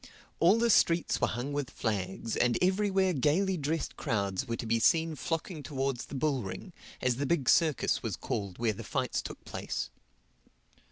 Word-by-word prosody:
All 185 +6 +5
the 235 0 +3
streets 170 -3 +3
were - - +4
hung 125 +5 -3
with 145 -3 -2
flags; 105 0 -2
and 120 -1 +2
everywhere 190 0 +2
gaily 170 +8 +2
dressed 160 0 -2
crowds 100 -2 -1
were 115 - -1
to 115 - -5
be 115 +1 +1
seen 165 +6 +3
flocking 165 +1 -3
towards 135 -3 -2
the - - -7
bull 140 -1 +1
ring, 95 -3 -7 0.3
as 125 -2 +2
the 140 +1 -1
big 145 -5 +1
circus 160 -5 +3
was - - -2
called 100 -3 -4
where 115 -2 +1
the - - -8
fights - - -1
took - - -9
place. - - -4
140 Hz, 175 wpm, -30 LUFS, 115-165 Hz, 0.3 s, All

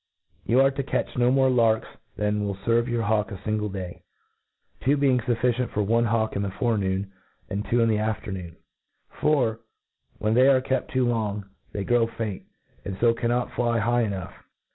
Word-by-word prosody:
You 120 +3 +3
are 135 0 +4
to 140 +1 -3
cat<;h 135 - -2
no 125 -1 +3
more 130 0 +4
larks 115 -3 +3 0.3
than 105 0 0
will 100 -1 -2
ferve 115 +4 +1
your 120 -2 -1
hawk 105 0 +1
a - - -4
iingfe 105 +2 -2
day, 95 -2 -6 0.8
two 140 +3 +2
being 135 -3 +3
fufficient 120 0 0
for 105 - -1
one 115 +3 +2
hawk 110 -1 0
in 100 - 0
the 100 - -1
forenoon, 100 -4 -1 0.4
and 100 +2 -2
two 120 0 +3
in 115 - +4
the 110 -1 +2
af 110 0 -1
ternoon: 90 -4 -6 0.5
For, 125 -7 +1 0.6
when 110 +1 0
they 130 +3 +5
are 135 -1 +6
kept 130 0 -2
too 130 -1 +1
long, 105 -4 -1 0.3
they 100 - -3
grow 120 +1 +2
faint, 110 -4 -5 0.4
and 95 -1 -5
k^ 115 +2 +3
cannot 120 +1 -1
fly 120 -1 0
high 120 +2 +2
enough. 100 -6 -3
115 Hz, 185 wpm, -25 LUFS, 105-120 Hz, 0.8 s, are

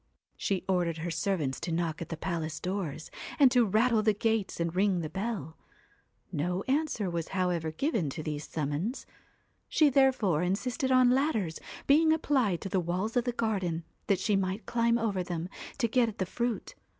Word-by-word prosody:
She 195 -2 -1
ordered 175 -3 +1
her 170 +2 -3
servants 165 -9 -1
to 175 - -4
knock 165 -1 -1
at 165 - -5
the 165 - -4
palace 160 -3 -3
doors, 180 -5 -4 0.3
and 275 -4 +6
to 245 -1 +5
rattle 220 +3 +3
the 215 -1 +2
gates 220 -3 0
and 170 0 -1
ring 190 -2 +2
the 155 - -5
bell; 190 - -4 0.7
no 180 +6 -1
answer 275 -7 0
was 170 -2 -2
however 175 -3 0
given 205 - 0
to 155 +3 -5
these 150 -1 -4
summonses. 155 - -2 0.6
She 300 -3 +4
therefore 255 - +3
insisted 240 +8 -1
on 255 -1 +6
ladders 250 - +1 0.3
being 315 +3 +5
applied 260 - +1
to 195 - -4
the 190 - +1
walls 180 +6 -2
of 245 -1 +2
the 245 - +1
garden, 190 -8 -1 0.2
that 200 - +3
she 205 +1 +1
might 190 +1 -1
climb 235 0 +2
over 215 -5 0
them, 175 -1 -4 0.3
to 240 - +2
get 235 0 +3
at 215 - -10
the 185 - 0
fruit. 235 +4 -3
195 Hz, 180 wpm, -30 LUFS, 170-235 Hz, 0.7 s, and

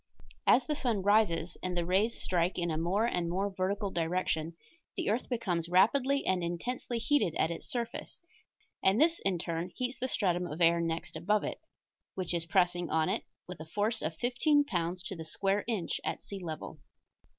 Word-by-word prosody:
As 250 - +6
the 300 - 0
sun 235 -9 0
rises 190 -5 +2
and 180 -1 -2
the 170 - +1
rays 200 +6 +2
strike 180 0 0
in 170 -2 0
a - - -1
more 190 +7 +1
and 175 -7 0
more 195 +3 -1
vertical 195 +2 -1
direction 165 -1 -1 0.4
the - - 0
earth 230 +4 -1
becomes 180 -9 -1
rapidly 260 +10 +3
and 185 -2 +1
intensely 230 +8 -3
heated 230 - +2
at 160 - +1
its 170 - -5
surface, 235 -2 -4 0.6
and 195 +4 +4
this 330 +2 +4
in 190 -2 0
turn 170 +1 -3
heats 255 +1 -3
the 260 - -1
stratum 180 -7 0
of 155 0 -6
air 170 0 +5
next 165 0 -3
above 210 +3 +1
it, - - -4 0.5
which 185 -2 -1
is 170 -1 -1
pressing 175 -1 +2
on 160 -1 +2
it - - -1 0.2
with 180 -2 -8
a 160 - -7
force 210 +6 0
of 160 +1 -2
fifteen 290 - +3
pounds 175 -5 -2
to 195 - -5
the 165 - -6
square 195 +6 0
inch 215 -8 -1
at - - -3
sea 200 - -6
level. 160 -1 -6
185 Hz, 190 wpm, -31 LUFS, 170-220 Hz, 0.6 s, As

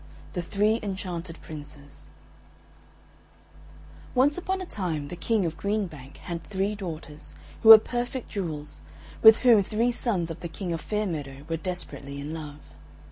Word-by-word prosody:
XXI 75 0 -19
THE 175 - -2
THREE 210 +5 +1
ENCHANTED 180 -4 -5
PRINCES 145 -2 -10 2.1
Once 275 +4 +4
upon 375 +1 -2
a 370 - -5
time 165 - -3
the - - -5
King 205 +3 0
of 165 -1 -2
Green 205 +4 0
Bank 140 -6 -11
had 170 -1 -6
three 195 +4 -1
daughters, 160 -6 -8 0.3
who 225 - +5
were 220 - +15
perfect 245 +3 -4
jewels, 155 -7 -5 0.4
with 220 0 +10
whom 230 -4 +7
three 225 +5 0
sons 195 -9 -1
of 165 - -7
the 170 - -6
King 175 +1 -4
of 165 - -3
Fair 210 0 -1
Meadow 145 -6 -5
were 165 0 -1
desperately 160 -5 -5
in 145 +2 -5
love. 150 -2 -9
180 Hz, 160 wpm, -27 LUFS, 155-215 Hz, 2.1 s, were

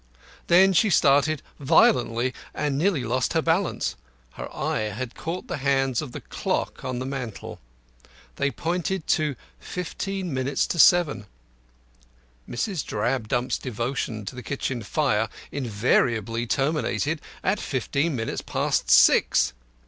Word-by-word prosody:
Then 190 +3 +6
she 205 +5 +4
started 145 -2 +3 0.2
violently, 125 -4 +3 0.2
and 150 -2 -1
nearly 160 -2 +1
lost 125 +5 0
her 165 - +2
balance. 170 +3 0 0.4
Her - - -8
eye 110 0 -2
had 120 +4 -5
caught 170 +3 -5
the - - -4
hands 135 -2 +1
of 150 -5 -7
the - - -7
clock - - -3
on 130 -1 -3
the 130 - -3
mantel. 130 -5 -6 0.8
They 140 - +1
pointed 175 +3 -2
to 150 -3 +1 0.2
fifteen 185 0 -4
minutes 130 +2 0
to 170 - -3
seven. 155 - +5 1.2
Mrs. 170 - -2
Drabdump's 120 +2 -1
devotion 120 -2 -3
to - - -5
the 125 - -6
kitchen 130 -2 -3
fire 110 -2 0 0.2
invariably 115 -2 0
terminated 150 +3 0 0.2
at 195 +2 +1
fifteen 140 +3 -1
minutes 115 -2 -3
past - - -1
six. 60 +2 +5
135 Hz, 125 wpm, -25 LUFS, 120-160 Hz, 1.2 s, Then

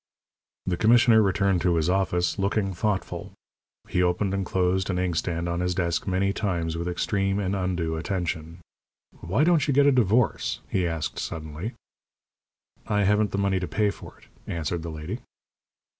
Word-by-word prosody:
The 90 -2 -1
commissioner 115 +1 +6
returned 95 -2 +2
to 85 0 +2
his 80 -1 +1
office, 90 -1 +1
looking 100 0 0
thoughtful. 95 +2 -2 0.5
He 90 - 0
opened 90 +2 +1
and 100 0 0
closed 95 +1 0
an 90 - 0
inkstand 85 -1 -1
on 85 0 -1
his 90 0 0
desk 85 -1 -1
many 95 +1 +1
times 85 -6 -1
with 85 +1 -3
extreme 95 +2 0
and 100 -1 -1
undue 90 -4 -1
attention. 85 -1 -3 0.6
"Why 100 - +1
don't 165 -3 +3
you 140 - +1
get 140 0 +5
a 145 - +6
divorce?" 115 - +2
he 90 -2 0
asked, 80 -2 -3
suddenly. 80 +6 -5 1.1
"I 105 -1 +2
haven't 105 +2 +3
the 100 - -3
money 100 -1 +1
to 90 - -3
pay 105 -2 +1
for - - -12
it," - - -20 0.3
answered 85 0 -2
the 85 - -5
lady. 80 +9 -5
95 Hz, 165 wpm, -26 LUFS, 85-100 Hz, 1.1 s, commissioner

